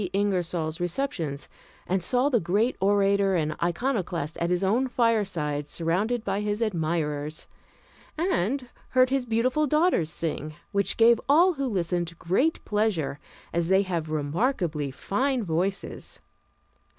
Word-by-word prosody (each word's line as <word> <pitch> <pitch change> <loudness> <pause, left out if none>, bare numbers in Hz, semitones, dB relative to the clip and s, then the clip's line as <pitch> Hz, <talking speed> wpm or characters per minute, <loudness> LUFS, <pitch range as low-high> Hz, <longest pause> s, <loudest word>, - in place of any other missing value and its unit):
Ingersoll's 180 -5 0
receptions 175 - -2 0.4
and 185 -1 0
saw 255 +8 +3
the 245 -5 +3
great 205 +8 +1
orator 200 0 +3
and 155 -2 0
iconoclast 175 - -1
at 170 - 0
his 180 +1 +1
own 230 +7 +2
fireside, 195 - 0
surrounded 195 +10 -1
by 195 +1 -1
his 210 0 -1
admirers, 155 -7 -2 0.7
and 275 - 0 0.2
heard 255 0 +3
his 270 -2 0
beautiful 255 +7 +1
daughters 305 - +2
sing, 155 -1 -4 0.2
which 200 -2 0
gave 230 0 +5
all 345 +6 +6
who 275 -3 -2
listened 175 -5 -2
great 250 - 0
pleasure, 205 -10 0 0.3
as 170 0 +1
they 190 +2 +4
have 170 -5 -3
remarkably 155 - -1
fine 250 - -1
voices. 185 +3 -2
195 Hz, 125 wpm, -26 LUFS, 165-235 Hz, 0.7 s, all